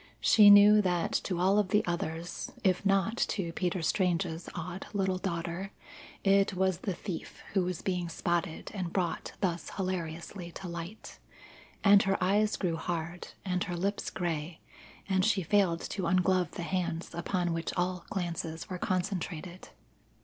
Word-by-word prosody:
She 215 Hz, -2 st, +7 dB
knew 205 Hz, +1 st, +9 dB
that 180 Hz, -3 st, 0 dB
to 180 Hz, -3 st, -2 dB
all 190 Hz, +3 st, +4 dB
of 200 Hz, -3 st, +1 dB
the 210 Hz, -, +3 dB
others, 170 Hz, -1 st, -3 dB
if 185 Hz, -1 st, +2 dB
not 195 Hz, +3 st, +2 dB
to 175 Hz, -8 st, -1 dB
Peter 180 Hz, 0 st, -1 dB
Strange's 175 Hz, -1 st, 0 dB
odd 175 Hz, +2 st, -5 dB
little 190 Hz, -2 st, 0 dB
daughter, 175 Hz, +1 st, -3 dB, 0.5 s
it 195 Hz, -1 st, +3 dB
was 190 Hz, -1 st, +1 dB
the 190 Hz, -1 st, -3 dB
thief 180 Hz, -3 st, -7 dB
who 190 Hz, -3 st, +2 dB
was 180 Hz, -2 st, -4 dB
being 180 Hz, -2 st, -1 dB
spotted 170 Hz, 0 st, -2 dB
and 185 Hz, -4 st, -3 dB
brought 175 Hz, -3 st, -2 dB
thus 175 Hz, -4 st, -1 dB
hilariously 175 Hz, -1 st, -4 dB
to 190 Hz, -, -7 dB
light. 170 Hz, +4 st, -7 dB, 0.6 s
And 200 Hz, 0 st, +7 dB
her 195 Hz, 0 st, +1 dB
eyes 205 Hz, +3 st, +2 dB
grew 170 Hz, -4 st, -1 dB
hard, 170 Hz, +1 st, -4 dB, 0.2 s
and 180 Hz, -1 st, 0 dB
her 175 Hz, -2 st, -4 dB
lips 200 Hz, +4 st, -1 dB
grey, 165 Hz, -2 st, -3 dB, 0.5 s
and 190 Hz, -1 st, +2 dB
she 205 Hz, -2 st, +2 dB
failed 175 Hz, -2 st, +2 dB
to 190 Hz, -, -3 dB
unglove 185 Hz, -2 st, +2 dB
the 175 Hz, -, -5 dB
hands 170 Hz, -2 st, -2 dB
upon 175 Hz, 0 st, -1 dB
which 165 Hz, 0 st, -2 dB
all 180 Hz, 0 st, -1 dB
glances 170 Hz, -1 st, -4 dB
were 180 Hz, -, -3 dB
concentrated. 180 Hz, -1 st, -3 dB
180 Hz, 155 wpm, -30 LUFS, 170-195 Hz, 0.6 s, knew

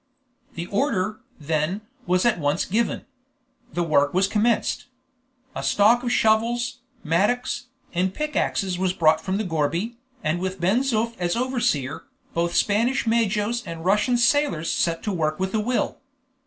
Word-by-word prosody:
The 170 Hz, -, -4 dB
order, 215 Hz, -1 st, -1 dB, 0.2 s
then, 155 Hz, +6 st, -1 dB, 0.3 s
was 180 Hz, +3 st, +2 dB
at 240 Hz, -7 st, +3 dB
once 145 Hz, +2 st, 0 dB
given. 225 Hz, +5 st, -1 dB, 0.7 s
The 175 Hz, -, 0 dB
work 145 Hz, -2 st, +2 dB
was 190 Hz, +1 st, +4 dB
commenced. 220 Hz, +4 st, 0 dB, 0.7 s
A -, -, -3 dB
stock 220 Hz, +4 st, +4 dB
of 245 Hz, -1 st, -2 dB
shovels, 235 Hz, +4 st, +2 dB, 0.2 s
mattocks, 240 Hz, +9 st, 0 dB, 0.3 s
and 185 Hz, +1 st, +1 dB
pick 300 Hz, +8 st, -4 dB
axes 185 Hz, -2 st, 0 dB
was 185 Hz, -1 st, +1 dB
brought 160 Hz, -3 st, +3 dB
from 190 Hz, +1 st, -2 dB
the 215 Hz, -, -1 dB
gourbi, 170 Hz, +6 st, -1 dB, 0.3 s
and 155 Hz, +3 st, 0 dB
with 185 Hz, +1 st, -3 dB
Ben 190 Hz, +7 st, +3 dB
Zoof 230 Hz, -3 st, 0 dB
as 175 Hz, -1 st, 0 dB
overseer, 235 Hz, -, -1 dB, 0.3 s
both 170 Hz, +1 st, 0 dB
Spanish 230 Hz, +6 st, +2 dB
majos 225 Hz, 0 st, +1 dB
and 165 Hz, -2 st, -7 dB
Russian 210 Hz, +6 st, +3 dB
sailors 240 Hz, -, +2 dB
set 165 Hz, -1 st, 0 dB
to 210 Hz, -, -1 dB
work 155 Hz, -2 st, -1 dB
with 190 Hz, 0 st, -2 dB
a 220 Hz, -, +2 dB
will. 240 Hz, +4 st, -1 dB
195 Hz, 155 wpm, -24 LUFS, 170-235 Hz, 0.7 s, was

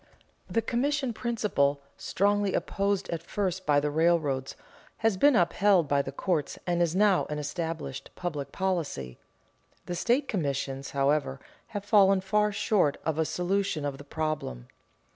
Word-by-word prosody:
The 230 Hz, -, 0 dB
commission 265 Hz, +2 st, 0 dB
principle, 210 Hz, -, 0 dB, 0.2 s
strongly 205 Hz, 0 st, +1 dB
opposed 200 Hz, 0 st, -1 dB
at 165 Hz, -2 st, -3 dB
first 185 Hz, +1 st, -3 dB
by 145 Hz, -1 st, +5 dB
the 145 Hz, +1 st, -1 dB
railroads, 150 Hz, -4 st, +1 dB, 0.5 s
has 225 Hz, -3 st, +4 dB
been 285 Hz, +8 st, +5 dB
upheld 185 Hz, -2 st, +3 dB
by 140 Hz, 0 st, +2 dB
the 135 Hz, -, -6 dB
courts 155 Hz, +1 st, -1 dB
and 175 Hz, -1 st, 0 dB
is 170 Hz, 0 st, +1 dB
now 200 Hz, -2 st, +3 dB
an 150 Hz, -, -3 dB
established 150 Hz, -2 st, -4 dB
public 155 Hz, -6 st, -4 dB
policy. 160 Hz, -, -2 dB, 0.7 s
The 175 Hz, -, -4 dB
state 250 Hz, +10 st, +1 dB
commissions, 140 Hz, -, -2 dB
however, 140 Hz, -1 st, +1 dB, 0.3 s
have 205 Hz, -2 st, -6 dB
fallen 195 Hz, -2 st, +5 dB
far 210 Hz, +3 st, +1 dB
short 200 Hz, -7 st, +1 dB
of 160 Hz, -1 st, -1 dB
a 160 Hz, -, +2 dB
solution 180 Hz, -3 st, -1 dB
of 140 Hz, -1 st, -4 dB
the -, -, -9 dB
problem. 145 Hz, -, -4 dB
175 Hz, 145 wpm, -28 LUFS, 145-200 Hz, 0.7 s, by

